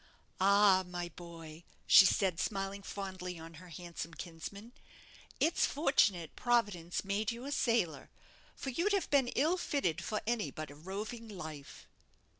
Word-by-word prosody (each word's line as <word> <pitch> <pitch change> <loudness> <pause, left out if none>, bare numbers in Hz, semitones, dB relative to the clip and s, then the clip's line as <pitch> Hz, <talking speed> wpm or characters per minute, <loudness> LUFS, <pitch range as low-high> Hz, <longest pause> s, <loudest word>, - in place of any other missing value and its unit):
"Ah! 195 0 +6
my 175 -1 -4
boy," 165 -1 -11 0.2
she 195 - +9
said, 185 -2 +1
smiling 195 0 -2
fondly 185 -3 -5
on 165 0 -10
her 180 - -13
handsome 170 0 -7
kinsman, 195 +6 -8 0.7
"it's 330 - +3
fortunate 210 - +2
Providence 205 -8 0
made 205 +2 0
you 235 +2 -7
a 285 - -4
sailor, 185 - +1 0.5
for 270 - -4
you'd 355 +10 +1
have 390 -4 0
been 275 -3 +4
ill 320 +7 +3
fitted 185 - -1
for 215 +3 -1
any 230 -1 0
but 155 -3 -7
a - - -11
roving 210 +8 -6
life." 155 -8 -9
195 Hz, 145 wpm, -33 LUFS, 170-230 Hz, 0.7 s, she